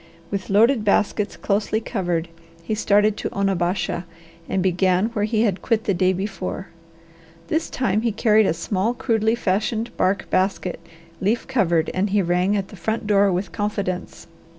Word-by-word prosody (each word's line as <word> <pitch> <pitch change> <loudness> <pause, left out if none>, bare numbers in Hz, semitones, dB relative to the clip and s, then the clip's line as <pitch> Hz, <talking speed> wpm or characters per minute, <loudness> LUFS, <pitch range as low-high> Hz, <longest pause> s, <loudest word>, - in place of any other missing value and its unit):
With 195 -2 -3
loaded 225 +4 +4
baskets 205 0 +1
closely 210 +1 0
covered, 175 -7 -2 0.4
he 215 - -2
started 210 0 +3
to - - -3
Onabasha, 185 -2 -1 0.4
and 190 - 0
began 185 +2 +2
where 210 -3 -1
he 215 0 +1
had 200 -5 0
quit 225 -1 0
the 200 - +1
day 185 +1 +2
before. 190 0 -4 0.8
This 320 - 0
time 215 -5 0
he 230 0 +1
carried 215 -1 +3
a - - +2
small, 195 +7 -1
crudely 225 -2 +1
fashioned 220 +2 -1
bark 195 +2 +1
basket, 185 -1 0 0.4
leaf 215 +5 0
covered, 175 -11 +1
and 195 +2 0
he 200 0 +2
rang 180 +3 +1
at 195 -1 -3
the - - -11
front 220 +5 -2
door 200 -1 +4
with 185 +1 -2
confidence. 200 -3 -3
200 Hz, 160 wpm, -22 LUFS, 185-220 Hz, 0.8 s, loaded